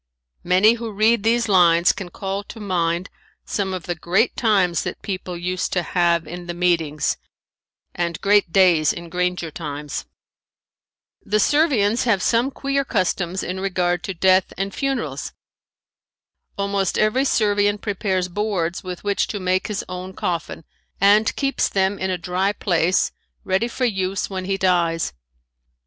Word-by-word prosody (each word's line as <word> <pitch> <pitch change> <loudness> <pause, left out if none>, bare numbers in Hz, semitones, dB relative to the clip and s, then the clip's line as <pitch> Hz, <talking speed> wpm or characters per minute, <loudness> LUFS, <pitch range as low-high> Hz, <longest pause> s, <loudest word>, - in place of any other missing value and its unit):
Many 185 +5 +5
who 230 -2 -4
read 215 +2 +3
these 230 +2 +2
lines 175 -3 +5
can 190 -3 -7
call 195 +2 -4
to 225 - -10
mind 175 -2 -1 0.4
some 195 -2 -2
of 185 -3 -4
the 175 - -2
great 180 +7 +1
times 195 -7 +2
that - - -6
people 185 -3 -4
used 180 +1 -2
to 180 - +1
have 170 -1 +1
in 175 +2 -8
the 175 - -4
meetings 165 -4 +1 0.8
and 170 -1 -2
great 200 -3 +3
days 175 -5 +4
in 170 0 -8
granger 180 -1 -1
times. 150 - -5 1.2
The 215 +1 +1
Servians 250 -4 +2
have 205 -6 +2
some 235 +3 +2
queer 275 0 -1
customs 185 -5 -1
in 185 +1 -4
regard 180 -2 0
to 195 - -4
death 185 +2 +3
and 195 +1 -3
funerals. 275 -1 -3 1.2
Almost 200 -1 0
every 215 +5 +2
Servian 205 -5 +2
prepares 195 -3 -1
boards 185 -3 -2
with 180 -1 -7
which 205 -1 0
to 205 - -4
make 185 0 0
his 210 -2 -3
own 185 +1 -6
coffin 170 -2 -3 0.4
and 205 +3 +4
keeps 275 0 0
them 195 0 0
in 190 - -1
a 185 - -1
dry 180 +4 -1
place 180 -3 +1 0.3
ready 190 +5 +1
for 255 +2 -2
use 195 -3 -1
when 185 -1 -4
he 195 0 -1
dies. 170 - +1
190 Hz, 150 wpm, -22 LUFS, 175-205 Hz, 1.2 s, Many